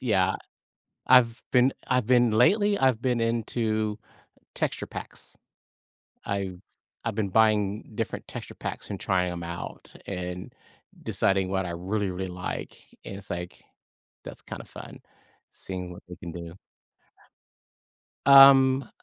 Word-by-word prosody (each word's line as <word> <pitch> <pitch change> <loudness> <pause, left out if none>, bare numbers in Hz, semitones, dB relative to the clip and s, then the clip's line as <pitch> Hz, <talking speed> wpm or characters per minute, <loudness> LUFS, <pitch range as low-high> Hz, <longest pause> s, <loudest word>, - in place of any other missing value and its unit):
Yeah. 95 -6 +2 0.7
I've 120 -2 +5
been 125 +1 +5 0.2
I've 125 -3 +2
been 120 -2 +4
lately 205 - +4
I've 130 - +2
been 125 -3 +1
into 110 -2 -1 0.6
texture - - -2
packs. - - -9 0.9
I've 95 -2 -3 0.4
I've 115 -2 -2
been 105 -3 -1
buying 105 -1 +2
different - - -4
texture - - -8
packs - - -6
and 100 - -5
trying 90 -2 0
'em 85 -1 -6
out 85 +1 -7
and 90 -1 -5 0.5
deciding 95 -1 +1
what 95 -1 0
I 85 - -4
really, 95 +4 -2
really 95 +1 -4
like 90 0 -6 0.3
and 95 - -7
it's 100 0 -12
like, 90 0 -6 0.6
that's - - -10
kind - - -8
of - - -18
fun - - -11 0.5
seeing 90 -1 -7
what 85 - -12
we 90 - -9
can 85 - -8
do. 85 0 -8 1.7
Um. 135 -1 +8
105 Hz, 130 wpm, -27 LUFS, 90-120 Hz, 1.7 s, Um